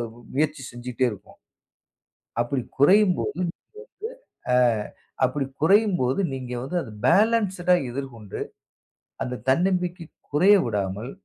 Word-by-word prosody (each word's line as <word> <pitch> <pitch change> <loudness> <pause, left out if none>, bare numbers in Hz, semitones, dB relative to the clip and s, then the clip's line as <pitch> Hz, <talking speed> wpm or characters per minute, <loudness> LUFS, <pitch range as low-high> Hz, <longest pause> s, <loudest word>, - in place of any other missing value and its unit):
ம் 120 - -16
முயற்சி 150 +1 0
செஞ்சிட்டே 120 +1 -2
இருக்கும். 105 - -12 1.1
அப்படி 125 +2 -2 0.2
குறையும்போது, 185 +6 +4
நீங்க - - +1
வந்து 175 -1 -3 1.0
அ, - - +5 0.7
அப்படி 145 -2 0 0.2
குறையும்போது 185 - +3
நீங்க 130 -2 -6
வந்து 135 +8 -4
அத 115 - -10 0.2
பேலன்சுடா 190 0 +3 0.2
எதிர்கொண்டு, 120 -5 -7 0.8
அந்தத் 125 -1 -5
தன்னம்பிக்கை 180 +3 +1 0.3
குறைய 185 +8 +6
விடாமல், 105 +1 -2
140 Hz, 105 wpm, -24 LUFS, 125-180 Hz, 1.1 s, குறைய